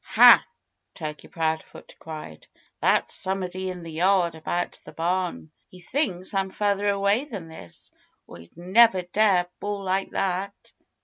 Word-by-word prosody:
"Ha!" - - +7 0.5
Turkey 155 -3 -7
Proudfoot 160 -2 -4
cried. 155 - -9 0.3
"That's - - +2
somebody 185 0 -3
in 180 -2 -7
the 165 - -8
yard, 175 +1 +2
around 170 +2 -3
the - - -12
barn. 175 -1 -2 0.2
He 185 - -14
thinks 185 - -2
I'm 195 -1 0
further 205 +1 0
away 200 +6 +1
than 200 - -7
this, 90 - -12 0.3
or - - -12
he'd 85 - -17
never 190 +2 +4
dare 185 0 +2
bawl 205 -1 -4
like 190 +1 -1
that." 195 +1 -2
185 Hz, 140 wpm, -25 LUFS, 165-200 Hz, 0.5 s, Ha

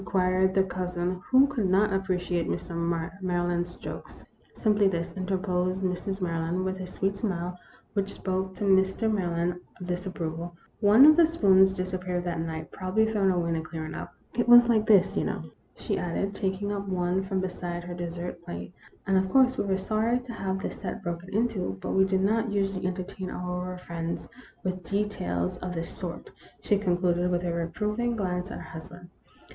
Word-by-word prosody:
queried 185 0 +2
the 190 - +5
cousin, 180 -1 -2
who 260 +1 +7
could 245 -9 -1
never 195 +2 +3
appreciate 180 -3 0
Mr. 175 - -3 0.5
Maryland's 175 -1 -1
jokes. - - -9 0.2
" - - -32
Simply 210 -2 +3
this," 170 -2 -2
interposed 185 -1 -1
Mrs. 185 +2 -2
Maryland, 170 +1 -1
with 190 0 -2
a 185 - -5
sweet 195 +2 -1
smile, 180 -4 -2 0.4
which 200 -1 -1
spoke 190 0 -2
to 195 - -5
Mr. 195 +3 +3
Maryland 175 -2 0 0.2
of 180 - -6
dis 180 +1 -3
approval, 170 -1 -4
" - - -38
one 230 +7 +9
of 310 0 +9
the 335 -2 +7
spoons 190 -12 +5
disappeared 185 -1 -2
that 175 -2 -2
night 160 -1 -4
probably 190 +4 +1
thrown 210 -3 +2
away 175 -2 +1
in - - +1
the 165 - -1
clearing 155 0 -6
up. - - -6 0.2
It 240 0 0
was 240 0 +9
like 220 -3 +3
this, 195 -3 +5
you - - +1
know," - - -2 0.3
she - - -2
added, 180 +3 -2
taking 195 +1 -2
up 200 -1 -3
one 180 0 0
from 190 0 -2
beside 175 -2 -4
her 175 0 -6
dessert 175 0 -5
plate, 175 0 -7 0.2
" - - -31
and, 195 -1 +3
of 190 0 -1
course, 255 +3 +5
we - - -1
were 190 -1 +2
sorry 215 +5 +1
to 245 -1 -8
have 190 -3 -3
the - - -2
set - - -6
broken 175 +1 -4
into; 205 - 0
but - - -4
we 190 0 +4
do 190 0 +1
not 220 +4 +2
usually 195 -2 0
entertain 185 0 -4
our 180 0 -4
friends 170 -1 -4 0.4
with 185 -1 -3
details 165 - -1
of 180 -1 -5
this 165 0 -3
sort," 175 -2 -6 0.3
she 205 - +1
concluded, 180 -2 +1
with 175 0 0
a 170 - 0
reproving 210 +8 -1
glance 180 -3 -2
at - - -6
her - - -8
husband. 175 +2 -10
185 Hz, 190 wpm, -28 LUFS, 175-195 Hz, 0.5 s, one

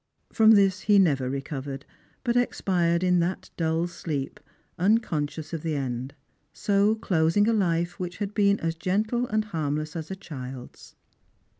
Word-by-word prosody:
From 220 -1 +6
this 195 -2 +4
he 205 - +7
never 140 -9 +3
revived, 135 0 -5 0.4
but 240 -2 0
expired 175 -8 +1
in 180 -1 +3
that 175 +2 -2
dull 165 0 0
sleep, 155 -5 -4 0.4
unconscious 170 -7 0
of 165 - -3
the 160 -1 -2
end; 130 -1 -4 0.4
so 205 +1 +2
closing 185 -1 +2
a 230 - +3
life 175 -3 0
which 180 -1 -5
had 205 -1 -4
been 200 -1 +3
as 165 0 0
gentle 215 +8 -1
and 215 -1 0
harmless 155 -4 -3
as 160 -2 -5
a 190 - -4
child's. 130 -9 -9
175 Hz, 150 wpm, -26 LUFS, 150-205 Hz, 0.4 s, he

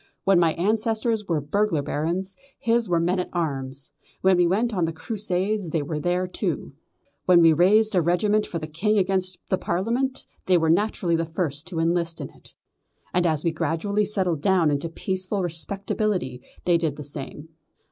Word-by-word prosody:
When 195 -2 +4
my 165 -2 +3
ancestors 220 +2 0
were 165 -3 +1
burglar 165 0 0
barons, 175 +7 -2 0.2
his 230 -2 +1
were 170 -1 +3
men 180 +3 +1
at 180 - -3
arms. 135 -5 -3 0.3
When 190 0 +5
we 175 -1 +4
went 220 +6 +1
on 180 -4 +1
the 165 - -3
Crusades 195 +1 -2
they 155 -2 -1
went 175 +5 -2
too; - - -2 0.5
when 180 -2 +6
we 165 -1 +7
raised 210 +7 +4
a 180 - +4
regiment 205 +6 +2
for 170 - -4
the 155 - -4
King 190 +8 0
against 185 -1 +1
the 190 - +2
Parliament 235 +9 -1 0.2
they 185 -1 +5
were 160 -1 +3
naturally 180 -2 +1
the 165 - +1
first 160 -2 -3
to 180 -2 -6
enlist 170 0 0
in 145 - -6
it; - - -14 0.6
and 180 -1 +2
as 155 -2 0
we 170 - +2
gradually 185 +6 0
settled 185 -7 0
down 180 -3 +3
into 145 +3 -1
peaceful 185 +3 -2
respectability 175 - -2 0.2
they 175 -1 +4
did 160 -4 -1
the 150 - -7
same. 145 +2 -7
175 Hz, 180 wpm, -24 LUFS, 160-200 Hz, 0.6 s, we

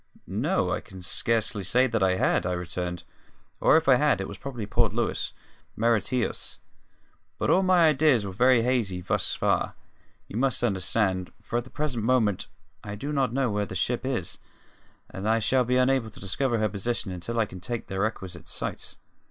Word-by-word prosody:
"N - - -2
o, - - +1
I - - 0
can 95 - -12
scarcely 110 +4 +1
say 125 +8 +3
that 115 -4 -1
I 95 -1 +3
had," - - +2
I 90 - -1
returned 90 0 -4 0.6
"or - - +5
if 160 - 0
I 130 -2 +7
had, 145 -4 +3
it 95 - -3
was 100 - -9
probably 120 -6 -5
Port 100 - +1
Louis, - - -1 0.4
Mauritius. 115 +2 0 0.8
But - - +1
all 190 - +5
my 180 -4 +5
ideas 140 -7 +3
are 95 - -4
very 125 +4 +4
hazy 115 -7 0
thus - - -1
far, - - 0 0.5
you 105 - -6
must 130 0 +1
understand, 95 -3 +1
for 120 - -3
at 120 - -2
the - - -13
present 135 -7 -2
moment 110 -5 +2 0.4
I 105 0 -6
do 140 +8 -4
not 135 -4 +1
know 130 -2 0
where 105 -1 -1
the 95 - -7
ship 120 +7 0
is, 125 -10 -3 0.7
and 100 +3 -4
I 110 - +4
shall 125 +3 +2
be 125 +2 +2
unable 130 -2 +2
to - - -14
discover 120 +6 0
her 110 0 +2
position 100 +1 -2
until 90 +6 -5
I 110 - +3
can 95 -2 -10
take 120 +5 -4
the 95 0 -5
requisite 95 -5 -3
sights. - - -4
115 Hz, 195 wpm, -26 LUFS, 95-130 Hz, 0.8 s, I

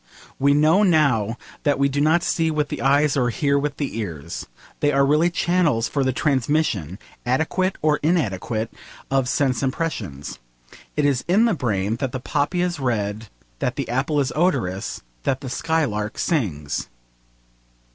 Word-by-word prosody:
We 140 +1 +4
know 155 +6 +4
now 140 - +3 0.2
that 145 -1 +2
we 140 0 +3
do 140 +1 -1
not 160 +3 +3
see 165 -3 +1
with 150 -2 0
the - - -4
eyes 140 +2 +3
or 125 -3 +2
hear 140 +4 +1
with 145 0 -3
the 140 -6 -3
ears. 85 -6 -5 0.3
They 145 - +2
are 140 -1 +3
really 150 +5 +3
channels 170 -9 +1
for 140 - 0
the 130 - +2
transmission, 130 - 0 0.3
adequate 160 +9 0
or 150 -1 +3
inadequate, 115 - -1 0.4
of 135 -2 +2
sense 140 -2 +1
impressions. 130 - -3 0.6
It 150 - +2
is 135 -3 +1
in 200 +7 +4
the 230 - +3
brain 110 - -1
that 130 -1 -3
the 130 - -2
poppy 150 +7 0
is 175 -3 -2
red, 110 -4 -2 0.3
that - - -1
the - - -3
apple 135 +5 0
is 140 -2 0
odorous, 100 - 0 0.2
that 130 - -1
the 130 -3 -6
skylark 125 -10 -1
sings. 85 - -1
140 Hz, 160 wpm, -22 LUFS, 115-155 Hz, 0.6 s, We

